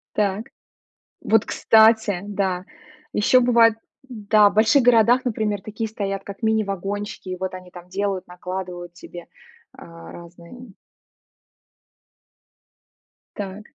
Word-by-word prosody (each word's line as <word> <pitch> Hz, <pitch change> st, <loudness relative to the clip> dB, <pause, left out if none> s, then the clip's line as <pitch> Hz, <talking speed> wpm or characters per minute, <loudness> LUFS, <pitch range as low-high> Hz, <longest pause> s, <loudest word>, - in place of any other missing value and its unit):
Так. 205 Hz, +1 st, -1 dB, 0.7 s
Вот, 220 Hz, -1 st, +2 dB
кстати, 220 Hz, -4 st, +3 dB
да 190 Hz, -3 st, -2 dB, 0.5 s
еще 235 Hz, +5 st, +3 dB
бывает, 235 Hz, -2 st, +4 dB, 0.3 s
да, 215 Hz, -3 st, +3 dB
в -, -, -12 dB
больших 220 Hz, +6 st, +4 dB
городах, 240 Hz, +1 st, +4 dB
например, 215 Hz, -4 st, -2 dB
такие 220 Hz, +1 st, -5 dB
стоят 195 Hz, -2 st, -4 dB
как 200 Hz, +3 st, -10 dB
мини-вагончики, 205 Hz, -2 st, -2 dB
и 185 Hz, -, -4 dB
вот 185 Hz, +1 st, -5 dB
они 185 Hz, -1 st, -11 dB
там 175 Hz, 0 st, -13 dB
делают 195 Hz, 0 st, -3 dB
накладывают 180 Hz, -1 st, -7 dB
тебе, 175 Hz, 0 st, -11 dB, 0.5 s
а, 85 Hz, -1 st, -13 dB
разные. 170 Hz, +2 st, -13 dB, 2.8 s
Так. 205 Hz, 0 st, -7 dB
205 Hz, 110 wpm, -22 LUFS, 185-220 Hz, 2.8 s, бывает